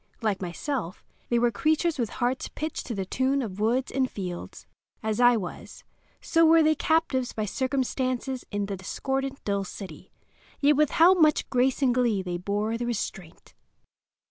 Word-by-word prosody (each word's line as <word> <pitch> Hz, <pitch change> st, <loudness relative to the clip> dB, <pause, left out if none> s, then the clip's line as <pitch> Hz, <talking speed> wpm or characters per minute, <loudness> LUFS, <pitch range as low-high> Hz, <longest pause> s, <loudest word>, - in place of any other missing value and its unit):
Like 205 Hz, -4 st, 0 dB
myself, 185 Hz, -, -4 dB, 0.3 s
they 240 Hz, -, +2 dB
were 240 Hz, 0 st, +3 dB
creatures 315 Hz, +6 st, +1 dB
with 230 Hz, -3 st, 0 dB
hearts 250 Hz, +1 st, -1 dB
pitched 310 Hz, 0 st, -4 dB
to 235 Hz, -, -3 dB
the 195 Hz, -1 st, -3 dB
tune 265 Hz, +7 st, 0 dB
of 200 Hz, -3 st, -6 dB
woods 240 Hz, +5 st, +1 dB
and 260 Hz, -1 st, 0 dB
fields; 180 Hz, -3 st, -7 dB, 0.4 s
as 220 Hz, 0 st, -1 dB
I 245 Hz, -1 st, +6 dB
was, 180 Hz, -5 st, -7 dB, 0.4 s
so 330 Hz, 0 st, +2 dB
were 325 Hz, 0 st, +6 dB
they 310 Hz, 0 st, +4 dB
captives 305 Hz, -5 st, 0 dB
by 215 Hz, -, -2 dB
circumstance 260 Hz, +2 st, -1 dB, 0.2 s
in 205 Hz, -1 st, -2 dB
the 200 Hz, 0 st, -4 dB
discordant, 270 Hz, +8 st, -3 dB
dull 200 Hz, -1 st, -1 dB
city—yet 215 Hz, +9 st, -4 dB
with 300 Hz, 0 st, +3 dB
how 340 Hz, +3 st, +8 dB
much 310 Hz, -5 st, +3 dB
grace 260 Hz, +2 st, +2 dB
and 250 Hz, -2 st, +4 dB
glee 235 Hz, -6 st, +1 dB
they 175 Hz, -1 st, -3 dB
bore 205 Hz, +5 st, -2 dB
the 240 Hz, -, -2 dB
restraint! 190 Hz, -7 st, -5 dB
245 Hz, 165 wpm, -26 LUFS, 205-275 Hz, 0.4 s, how